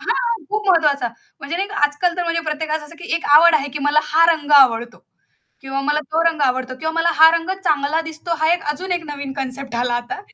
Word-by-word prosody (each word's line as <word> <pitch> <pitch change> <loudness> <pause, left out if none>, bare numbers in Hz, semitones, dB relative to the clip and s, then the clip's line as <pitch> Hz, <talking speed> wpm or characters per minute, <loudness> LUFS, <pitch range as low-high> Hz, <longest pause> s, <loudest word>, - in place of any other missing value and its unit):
हां, 470 -2 -2
खूप 425 0 -3
महत्त्वाचा. 300 -8 +2 0.3
म्हणजे 280 +5 -4
नाही 390 +2 -2 0.2
आजकाल 340 +4 -2
तर 355 - -1
म्हणजे 335 0 -1
प्रत्येकास 310 0 -3
असं, 300 +3 -12
की 350 - -11
एक 335 - -3
आवड 335 +1 +6
आहे 285 -2 0
की - - -2
मला 290 +1 +3
हा 325 +2 +3
रंग 300 -2 -6
आवडतो 240 -2 +2 0.6
किंवा 270 0 -4
मला 295 +2 0
तो 325 +1 +2
रंग 320 -2 -4
आवडतो 255 -1 -1
किंवा 320 +2 -3
मला 335 +1 +1
हा 320 +1 +8
रंग 335 +2 -4
चांगला 300 -1 +1
दिसतो 325 +1 -5
हा 315 +1 +2
एक 350 - -1
अजून 365 +4 -5
एक 350 - -2
नवीन 280 -2 -6
कन्सेप्ट 270 -1 -6
आला 240 0 -1
आता 240 +13 -6
310 Hz, 220 wpm, -19 LUFS, 275-335 Hz, 0.6 s, हा